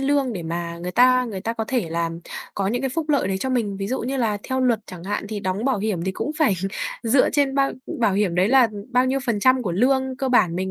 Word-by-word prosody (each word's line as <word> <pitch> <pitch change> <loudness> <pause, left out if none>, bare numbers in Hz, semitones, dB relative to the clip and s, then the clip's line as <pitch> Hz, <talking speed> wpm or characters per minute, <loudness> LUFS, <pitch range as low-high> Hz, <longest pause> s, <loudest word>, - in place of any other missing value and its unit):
lương 275 -2 +1
để 185 -5 -5
mà 170 +1 -4
người 175 +1 -4
ta 250 +5 +4
người 210 -6 -5
ta 225 +4 -2
có 225 -1 -3
thể 240 -10 0
là 165 0 -1 0.4
có 195 - -1
những 245 +6 -1
cái 270 - 0
phúc 310 +4 -3
lợi 285 -10 +2
đấy 190 -1 -1
cho 265 - -2
mình. 220 -6 -1
Ví 195 0 -3
dụ 260 +6 -2
như 260 +4 -2
là 220 -5 0
theo 260 0 -2
luật 240 -4 +2
chẳng 180 -2 -10
hạn, 205 +1 -3
thì 210 -1 -4
đóng 190 +3 -2
bảo 265 -5 +1
hiểm 195 -5 -2
thì 190 - -1
cũng 280 - -3
phải 285 -11 +3 0.5
dựa 255 +3 +3
trên 280 -2 +1
bao 275 0 +2 0.3
bảo 220 -4 +3
hiểm 195 -3 +1
đấy 180 +3 +3
là 255 -1 +5 0.2
bao 250 0 +3
nhiêu 265 +1 +1
phần 225 -4 0
trăm 255 +2 +4
của 190 -7 -2
lương 260 +6 +1
cơ 270 - -1
bản 200 -9 +3
mình 190 +1 -2
230 Hz, 275 wpm, -23 LUFS, 190-260 Hz, 0.5 s, là